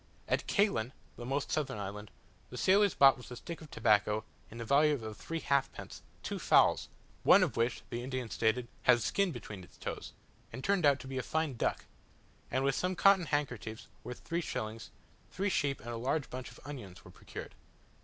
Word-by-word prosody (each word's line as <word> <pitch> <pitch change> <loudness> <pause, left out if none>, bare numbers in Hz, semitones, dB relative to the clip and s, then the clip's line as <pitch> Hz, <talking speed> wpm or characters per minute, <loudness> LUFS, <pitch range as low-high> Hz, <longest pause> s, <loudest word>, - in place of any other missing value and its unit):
At - - 0
Caylen, 130 - +2 0.2
the 120 - -7
most 140 +2 -1
southern 150 -8 -1
island, 105 +1 -6 0.4
the 125 - -8
sailors 200 +5 +4
bought 135 -1 +7
with 125 - -11
a 125 - -7
stick 165 +7 -7
of 155 - -11
tobacco, 105 -2 +2 0.3
of 115 - -10
the 115 - -5
value 145 +4 +4
of 110 -1 -6
three 165 +8 -5
halfpence, 140 -1 -1 0.2
two - - -3
fowls, - - +4 0.3
one - - +7
of - - -1
which, 115 +1 0
the 120 0 -3
Indian 130 -1 -3
stated, 115 +2 +1
had 120 -2 +5
skin 200 - +1
between 100 - -8
its - - -17
toes, - - -6 0.4
and 130 - -7
turned 195 -6 +3
out 140 -1 +4
to - - -9
be 130 0 -3
a - - 0
fine 155 +1 -1
duck; - - -1 0.6
and 130 +1 0
with 140 0 +2
some 180 +5 -1
cotton 195 -3 +5
handkerchiefs, 125 -6 -2 0.2
worth 125 +1 -7
three 170 +1 -2
shillings, 110 -7 -4 0.4
three 200 +2 -1
sheep 145 -6 0
and 120 - -8
a 115 - -3
large 135 +5 -1
bunch 130 0 -5
of - - -14
onions 120 -11 -8
were - - -12
procured. - - -9
130 Hz, 195 wpm, -32 LUFS, 115-155 Hz, 0.6 s, bought